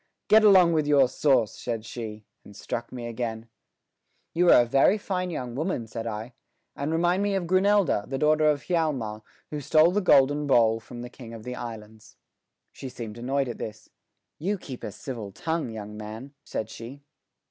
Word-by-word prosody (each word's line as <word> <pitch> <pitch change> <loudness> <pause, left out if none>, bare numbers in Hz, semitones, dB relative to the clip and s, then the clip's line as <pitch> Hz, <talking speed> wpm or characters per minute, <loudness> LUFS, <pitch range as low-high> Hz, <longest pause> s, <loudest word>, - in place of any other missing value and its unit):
"Get 220 +1 +7
along 185 -5 +7
with 155 -2 +1
your 140 -3 +5
sauce!" 130 -4 +2
said 115 -2 -4
she, 110 -2 -7 0.2
and 100 - -14
struck 115 - -5
me 125 -2 -6
again. 115 -1 -4 0.9
"You 175 +1 +3
are 120 - +8
a - - -4
very 135 - +4
fine 185 -3 -3
young 125 -8 -5
woman," 145 -3 -2
said 115 +1 -6
I, 110 +2 -5 0.4
"and 140 +2 -3
remind 175 +3 +2
me 205 -1 0
of 190 -2 -1
Grunelda, 185 - +3
the 135 - -2
daughter 155 +1 +3
of 145 -1 0
Hjalmar, 140 -12 -1 0.3
who 150 -1 -4
stole 155 +4 +4
the 205 +3 +1
golden 145 -3 +4
bowl 115 -4 +4
from 120 +2 -10
the 120 - -7
King 115 -3 -10
of 110 - -10
the 125 - -5
Islands." 110 -3 -9 0.5
She 135 - -8
seemed 115 -2 -8
annoyed 135 +3 0
at 120 - -6
this. 105 -1 -7 0.5
"You 195 +6 -1
keep 130 -8 -9
a 105 - -4
civil 115 -4 -7
tongue, 160 - -3
young 105 -1 -7
man," 110 +6 -8
said 110 0 -4
she. 130 +5 -10
130 Hz, 185 wpm, -26 LUFS, 115-160 Hz, 0.9 s, are